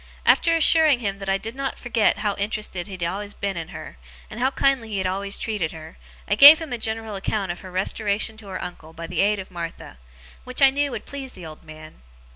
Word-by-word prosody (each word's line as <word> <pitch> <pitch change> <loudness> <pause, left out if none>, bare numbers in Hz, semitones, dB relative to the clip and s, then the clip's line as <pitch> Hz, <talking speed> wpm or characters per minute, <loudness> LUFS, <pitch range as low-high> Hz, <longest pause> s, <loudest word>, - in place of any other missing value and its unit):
After 330 -1 +4
assuring 315 -5 +4
him 200 -3 -3
that 195 -1 -5
I 195 - +2
did 225 +3 -6
not 275 0 -3
forget 235 -3 +1
how 205 - +2
interested 205 -3 -3
he 200 - -9
had 180 -2 -5
always 200 +4 -4
been 200 -1 -3
in 165 -2 -5
her, - - -10 0.3
and 220 - -8
how 260 +2 +2
kindly 270 -4 +1
he 205 - -3
had 190 - -1
always 195 +2 -2
treated 205 -8 -2
her, 160 0 -11 0.3
I - - +1
gave 285 +8 +10
him 315 -6 -6
a 240 - -3
general 220 -1 -3
account 195 -1 -2
of 175 - -7
her 185 - -10
restoration 205 +3 -1
to 215 -2 -14
her 185 -1 -5
uncle 160 -2 -9
by 165 +1 -7
the - - -1
aid 205 +1 +2
of 190 -1 -8
Martha; 170 - -8 0.4
which 255 0 -5
I 275 -1 +7
knew 285 +1 0
would 250 - -6
please 270 -2 -7
the 180 - -11
old 155 -1 -11
man. 155 - -13
205 Hz, 240 wpm, -23 LUFS, 185-245 Hz, 0.4 s, gave